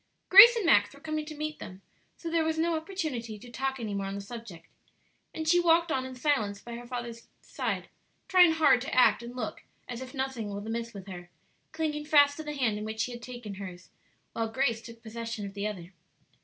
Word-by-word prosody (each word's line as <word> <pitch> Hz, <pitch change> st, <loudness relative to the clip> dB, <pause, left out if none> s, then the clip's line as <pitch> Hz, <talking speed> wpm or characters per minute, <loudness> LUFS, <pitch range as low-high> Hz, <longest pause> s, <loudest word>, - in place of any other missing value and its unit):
Grace 480 Hz, 0 st, +11 dB
and 450 Hz, -5 st, -1 dB
Max 205 Hz, -4 st, +4 dB
were -, -, -15 dB
coming 310 Hz, 0 st, -3 dB
to 310 Hz, -, -7 dB
meet 305 Hz, 0 st, -4 dB
them, 185 Hz, +1 st, -10 dB, 0.3 s
so 335 Hz, -, -8 dB
there 330 Hz, 0 st, +1 dB
was 320 Hz, 0 st, -1 dB
no 330 Hz, +1 st, +1 dB
opportunity 315 Hz, -, -4 dB
to 240 Hz, +3 st, -13 dB
talk 265 Hz, +2 st, -2 dB
any 215 Hz, -3 st, -4 dB
more 195 Hz, -1 st, -2 dB
on 195 Hz, -, -4 dB
the -, -, -4 dB
subject, 200 Hz, -4 st, -9 dB, 0.7 s
and 315 Hz, 0 st, -5 dB
she 350 Hz, +2 st, +5 dB
walked 335 Hz, -1 st, +3 dB
on 260 Hz, -2 st, -1 dB
in 260 Hz, -, -9 dB
silence 245 Hz, -7 st, 0 dB
by 235 Hz, -, -9 dB
her 240 Hz, +1 st, -8 dB
father's 240 Hz, -2 st, -6 dB, 0.2 s
side, -, -, -3 dB, 0.4 s
trying 360 Hz, -3 st, +6 dB
hard 295 Hz, -6 st, +4 dB
to 270 Hz, -, -4 dB
act 230 Hz, -4 st, +5 dB
and 240 Hz, +1 st, -9 dB
look 220 Hz, -4 st, -5 dB, 0.3 s
as 240 Hz, 0 st, -6 dB
if 260 Hz, +2 st, -9 dB
nothing 265 Hz, -5 st, -3 dB
was 200 Hz, +1 st, -6 dB
amiss 230 Hz, +1 st, -3 dB
with 200 Hz, -4 st, -10 dB
her, 175 Hz, -2 st, -9 dB, 0.4 s
clinging 310 Hz, -2 st, -2 dB
fast 285 Hz, -2 st, +5 dB
to -, -, -5 dB
the 300 Hz, -1 st, -5 dB
hand 225 Hz, -6 st, 0 dB
in -, -, -5 dB
which 220 Hz, +1 st, -2 dB
he 250 Hz, -, -4 dB
had 240 Hz, 0 st, -8 dB
taken 240 Hz, -4 st, -8 dB
hers, 185 Hz, -2 st, -9 dB, 0.4 s
while 225 Hz, -1 st, -2 dB
Grace 235 Hz, -1 st, 0 dB
took 230 Hz, 0 st, -13 dB
possession 230 Hz, -1 st, -5 dB
of 195 Hz, -, -7 dB
the 200 Hz, +1 st, -2 dB
other. 185 Hz, -3 st, -7 dB
240 Hz, 225 wpm, -29 LUFS, 215-305 Hz, 0.7 s, Grace